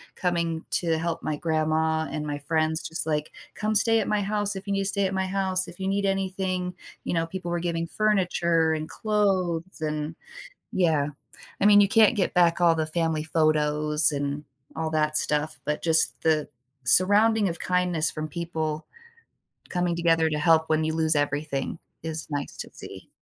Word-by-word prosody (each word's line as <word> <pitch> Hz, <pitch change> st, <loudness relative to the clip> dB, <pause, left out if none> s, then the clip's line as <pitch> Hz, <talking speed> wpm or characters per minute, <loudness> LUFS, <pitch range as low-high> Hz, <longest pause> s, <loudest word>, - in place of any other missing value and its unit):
coming 170 Hz, -2 st, -2 dB
to 165 Hz, -2 st, +1 dB
help 165 Hz, 0 st, -3 dB
my 150 Hz, -1 st, -2 dB
grandma 160 Hz, 0 st, 0 dB
and 150 Hz, -1 st, -4 dB
my 145 Hz, 0 st, -3 dB
friends 160 Hz, +2 st, 0 dB
just 160 Hz, 0 st, -1 dB
like, 150 Hz, -1 st, -2 dB, 0.2 s
"Come 215 Hz, +1 st, -1 dB
stay 225 Hz, +2 st, +4 dB
at 205 Hz, -, -2 dB
my 210 Hz, -1 st, 0 dB
house 205 Hz, 0 st, -2 dB
if 190 Hz, +1 st, -8 dB
you 200 Hz, -, -1 dB
need 195 Hz, -, 0 dB
to -, -, -2 dB
stay 200 Hz, 0 st, 0 dB
at 190 Hz, -, -5 dB
my 190 Hz, -, 0 dB
house, 185 Hz, -1 st, 0 dB
if 175 Hz, +2 st, -10 dB
you 190 Hz, -, -3 dB
need 200 Hz, +1 st, 0 dB
anything," 190 Hz, -2 st, -2 dB, 0.3 s
you -, -, -3 dB
know, 165 Hz, -, 0 dB
people 175 Hz, +1 st, -6 dB
were 175 Hz, -, -1 dB
giving 165 Hz, -1 st, -2 dB
furniture 170 Hz, -6 st, +1 dB
and 155 Hz, 0 st, -4 dB
clothes 185 Hz, -5 st, -1 dB
and 150 Hz, 0 st, -3 dB, 0.6 s
Yeah, 160 Hz, -6 st, +2 dB, 0.6 s
I -, -, +3 dB
mean, 205 Hz, 0 st, +7 dB
you 200 Hz, -, +4 dB
can't 225 Hz, +2 st, +5 dB
get 185 Hz, -, 0 dB
back 175 Hz, -1 st, +3 dB
all 170 Hz, -1 st, +4 dB
the 160 Hz, -1 st, -1 dB
family 160 Hz, -1 st, 0 dB
photos 150 Hz, -1 st, +2 dB
and 145 Hz, +1 st, -3 dB, 0.3 s
all 160 Hz, 0 st, -2 dB
that 155 Hz, -1 st, +3 dB
stuff, 150 Hz, +1 st, 0 dB
but 150 Hz, 0 st, -2 dB
just 165 Hz, -1 st, +3 dB
the 155 Hz, -2 st, +1 dB, 0.3 s
surrounding 205 Hz, -, +5 dB
of 170 Hz, -, -5 dB
kindness 180 Hz, -4 st, +1 dB
from 155 Hz, 0 st, -5 dB
people 160 Hz, -1 st, -4 dB, 0.9 s
coming 175 Hz, -1 st, -1 dB
together 165 Hz, -1 st, +2 dB
to 150 Hz, -, -2 dB
help 160 Hz, +1 st, +3 dB
when 155 Hz, 0 st, +1 dB
you 160 Hz, -, -1 dB
lose 160 Hz, -1 st, +2 dB
everything 145 Hz, +1 st, -2 dB, 0.3 s
is 160 Hz, 0 st, -2 dB
nice 145 Hz, -1 st, -4 dB
to -, -, -4 dB
see. -, -, -11 dB
165 Hz, 185 wpm, -25 LUFS, 155-185 Hz, 0.9 s, mean